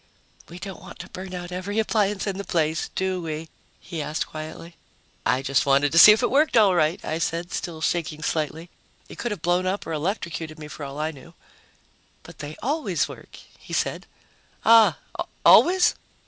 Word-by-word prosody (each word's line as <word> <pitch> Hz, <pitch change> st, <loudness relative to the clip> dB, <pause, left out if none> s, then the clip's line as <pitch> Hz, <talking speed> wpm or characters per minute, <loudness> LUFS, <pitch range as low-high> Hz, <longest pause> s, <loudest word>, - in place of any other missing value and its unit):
"We 170 Hz, -, -10 dB
don't 190 Hz, +1 st, -8 dB
want -, -, -11 dB
to -, -, -9 dB
burn 185 Hz, 0 st, -7 dB
out 175 Hz, 0 st, -7 dB
every 185 Hz, +4 st, -4 dB
appliance 210 Hz, -2 st, +1 dB
in 195 Hz, -1 st, -3 dB
the -, -, -3 dB
place, 160 Hz, -4 st, -1 dB
do 190 Hz, -1 st, -1 dB
we?" 160 Hz, -1 st, -5 dB, 0.3 s
he 165 Hz, -4 st, -6 dB
asked 150 Hz, +1 st, -2 dB
quietly. 160 Hz, +2 st, -9 dB, 0.5 s
"I 130 Hz, +1 st, +1 dB
just 140 Hz, +1 st, +1 dB
wanted 140 Hz, +1 st, +3 dB
to 165 Hz, -, +5 dB
see 210 Hz, -, +11 dB
if 220 Hz, +4 st, +3 dB
it 245 Hz, -, +1 dB
worked 290 Hz, -1 st, +3 dB
all 205 Hz, -4 st, +6 dB
right," 165 Hz, 0 st, +2 dB
I 160 Hz, +1 st, -2 dB
said, 170 Hz, +3 st, -2 dB
still 165 Hz, -3 st, -4 dB
shaking 155 Hz, -2 st, -2 dB
slightly. 160 Hz, +2 st, -3 dB, 0.4 s
It -, -, -11 dB
could 240 Hz, -, -2 dB
have 205 Hz, -7 st, -6 dB
blown 180 Hz, +1 st, +1 dB
up 195 Hz, +2 st, -2 dB
or 165 Hz, -, -4 dB
electrocuted 160 Hz, -1 st, -3 dB
me, 150 Hz, -1 st, -9 dB
for 150 Hz, -, -8 dB
all 140 Hz, +1 st, -8 dB
I 155 Hz, +1 st, -1 dB
knew. 160 Hz, +3 st, -15 dB, 0.9 s
"But -, -, -14 dB
they 150 Hz, +1 st, -7 dB
always 295 Hz, +6 st, 0 dB
work," -, -, -12 dB, 0.2 s
he -, -, -11 dB
said. -, -, -1 dB, 0.6 s
"Ah 225 Hz, -1 st, +6 dB, 0.5 s
always?" 365 Hz, +1 st, +6 dB
170 Hz, 190 wpm, -24 LUFS, 155-195 Hz, 0.9 s, see